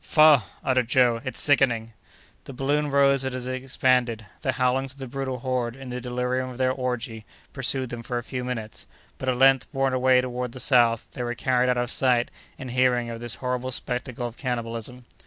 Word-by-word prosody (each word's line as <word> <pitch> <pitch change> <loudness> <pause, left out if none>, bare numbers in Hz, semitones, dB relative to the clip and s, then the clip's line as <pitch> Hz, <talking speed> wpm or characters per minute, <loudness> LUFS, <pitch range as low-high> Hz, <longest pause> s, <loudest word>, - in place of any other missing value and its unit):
"Faugh!" 155 -5 +6 0.2
uttered 130 -2 +1
Joe, 125 -3 +3
"it's 130 -3 0
sickening." 120 -6 +3 0.5
The 135 - -9
balloon 145 +3 0
rose 140 -1 +3
as 130 -1 -3
it 130 0 -4
expanded; 125 -4 +1 0.2
the 130 -3 0
howlings 130 +1 0
of - - -22
the 135 - -6
brutal 130 0 -4
horde, 125 -2 -2
in 135 -2 -9
the 125 0 -4
delirium 125 +1 -2
of 125 - -9
their 130 0 +2
orgy, 125 -4 -4 0.3
pursued 130 -1 -1
them 120 -1 -5
for 120 +1 -4
a 120 - -3
few 125 +1 -5
minutes; 115 -4 -5 0.3
but, 130 - -2
at 125 - 0
length, 135 0 +4
borne 135 -2 0
away 130 0 +4
toward 125 -1 -3
the 130 - -8
south, 120 -4 +3
they 130 - -7
were 120 0 -2
carried 125 +1 +1
out 125 - +2
of 120 0 -1
sight 125 -2 +1 0.3
and 130 -2 -7
hearing 125 -1 +2
of 115 - -6
this 120 -3 -5
horrible 125 0 -3
spectacle 125 -1 -4
of 120 0 -6
cannibalism. 120 -1 -4
125 Hz, 200 wpm, -25 LUFS, 120-130 Hz, 0.5 s, Faugh